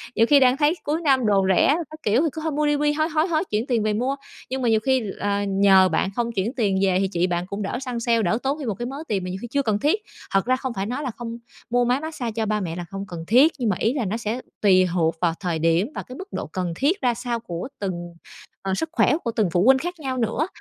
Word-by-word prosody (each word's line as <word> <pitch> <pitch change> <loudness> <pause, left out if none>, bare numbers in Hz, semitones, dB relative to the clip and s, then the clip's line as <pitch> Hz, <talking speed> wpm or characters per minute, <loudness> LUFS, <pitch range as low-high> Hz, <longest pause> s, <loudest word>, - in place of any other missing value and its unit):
Nhiều 225 - +5
khi 285 +4 +6
đang 255 0 +4
thấy 300 +3 +3
cuối 310 +3 -1
năm 265 -6 +3
đồ 200 -2 +3
rẻ - - +4 0.2
các 310 - -10
kiểu 215 +5 +3
thì 325 - +2
cứ 315 - -5
thôi 320 - -1
mua 300 +1 0
đi, 295 0 +2
mua 295 - -1
đi, 295 0 +3
hối, 310 +2 0
hối, 315 +1 +1
hối 320 -2 +1
chuyển 215 +4 0
tiền 235 -4 +1
về 215 0 +1
mua, 250 +6 0 0.3
nhưng 260 0 -3
mà 240 - +2
nhiều 220 -1 +4
khi 260 +3 +1
là 200 0 -2
nhờ 195 -1 +5
bạn 170 +3 0
không 235 -1 -1
chuyển 220 +2 -2
tiền 205 -7 +1
về 190 -2 +3
thì 195 - +1
chị 180 -2 0
bạn 175 0 -1
cũng 200 +2 -5
đỡ 205 +5 -3
săn 250 -3 -4
sale, 230 -1 +2
đỡ 215 +3 +1
tốn 275 +3 -1
thêm 280 - -5
một 215 - -1
cái 240 - -5
mớ 265 +3 -5
tiền 195 -3 -1
mà 180 - -4
nhiều 185 +1 -5
khi 240 - -5
chưa 280 +1 +2
cần 215 -5 0
thiết. 315 - +1 0.3
Thật 195 -1 +2
ra 255 +1 +3
không 255 -1 -4
phải 195 -3 -3
nói 250 +7 -3
là 255 - -2
không 235 -1 -6 0.3
mua 245 +1 +2
máy 250 +3 +2
mát 315 0 -6
xa 240 -4 -3
cho 220 0 -2
ba 215 0 0
mẹ 165 -3 -4
là 175 0 -5
không 195 0 -5
cần 170 -2 -7
thiết, 265 +8 +5
nhưng 240 -3 +1
mà 195 - +1
ý 225 - +1
là 265 -6 -1
nó 205 +4 -2
sẽ 230 +2 -3 0.2
tùy 185 -3 +5
thuộc 165 -2 +1
vào 170 -2 +2
thời 175 -4 -2
điểm 165 - +2
và - - -4
cái 255 - -10
mức 380 - -8
độ - - -4
cần 180 -3 -3
thiết 330 - +1
ra 245 -1 +2
sao 240 0 -3
của 175 -3 -6
từng, 175 -3 -4 0.5
ờ, 195 -1 -2
sức 320 +9 -2
khỏe 340 - +3
của 235 - -1
từng 210 -6 +2
phụ 175 +1 +2
huynh 265 +1 +7
khác 350 +2 -5
nhau 265 -3 -3
nữa. 245 +7 0
230 Hz, 305 wpm, -23 LUFS, 195-265 Hz, 0.5 s, huynh